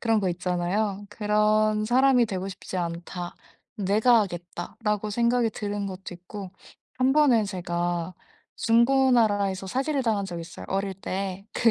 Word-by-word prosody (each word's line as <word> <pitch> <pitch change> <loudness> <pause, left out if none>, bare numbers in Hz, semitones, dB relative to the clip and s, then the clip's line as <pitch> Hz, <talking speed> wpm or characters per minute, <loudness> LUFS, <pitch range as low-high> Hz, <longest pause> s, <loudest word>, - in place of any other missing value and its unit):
그런 225 -2 +2
거 190 - 0
있잖아요. 185 +3 -1
'그런 210 0 +2
사람이 250 0 +4
되고 190 -2 -3
싶지 185 0 -7
않다. 175 0 -4 0.4
내가 215 +4 +4
하겠다.'라고 200 +4 -4
생각이 235 +2 +2
드는 205 -1 -3
것도 190 -1 -7
있고 185 +2 -9 0.5
한번은 260 -4 +4
제가 175 -2 -2 0.4
중고나라에서 230 -5 +3
사기를 270 +5 0
당한 215 -4 +1
적이 170 -3 -5
있어요 165 - -10
어릴 195 0 -1
때. 195 +1 -4
그 235 - +3
205 Hz, 305 characters per minute, -26 LUFS, 185-230 Hz, 0.5 s, 사람이